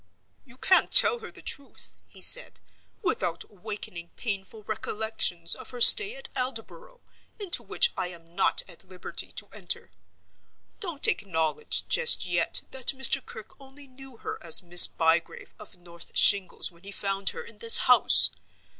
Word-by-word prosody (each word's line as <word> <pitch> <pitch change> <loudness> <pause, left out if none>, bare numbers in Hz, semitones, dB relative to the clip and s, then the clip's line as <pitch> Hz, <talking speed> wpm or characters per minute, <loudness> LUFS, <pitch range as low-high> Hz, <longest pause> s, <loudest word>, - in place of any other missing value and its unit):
"You 255 -2 -20
can't 375 +6 0
tell 480 - +6
her 460 - -12
the - - -16
truth," 280 -1 -5
he - - -16
said, - - +5 0.4
"without 170 - -4
awakening 200 -4 -10
painful 210 -1 -8
recollections 210 -5 -3
of - - -8
her 245 - -10
stay 420 - +7
at - - -6
Aldborough, 260 - -7 0.4
into 400 -5 -2
which 480 - -2
I 185 - -5
am 170 -1 -15
not 190 - 0
at - - -15
liberty 185 -1 -7
to - - -8
enter. - - -6 0.9
Don't 340 -9 0
acknowledge 160 -6 -3
just 485 -1 +4
yet - - -1
that 265 0 -2
Mr. 265 0 +5
Kirke 220 -1 -14
only 275 +1 -15
knew 265 -1 -16
her - - -10
as 170 +1 +3
Miss 175 0 +8
Bygrave 165 +1 -4
of 210 -3 -14
North 170 -1 -10
Shingles 200 -3 +3
when 170 0 -25
he 200 - -11
found 195 -1 -3
her 475 - -9
in 475 - -18
this 460 -1 +5
house. - - +4
220 Hz, 155 wpm, -24 LUFS, 180-275 Hz, 0.9 s, Miss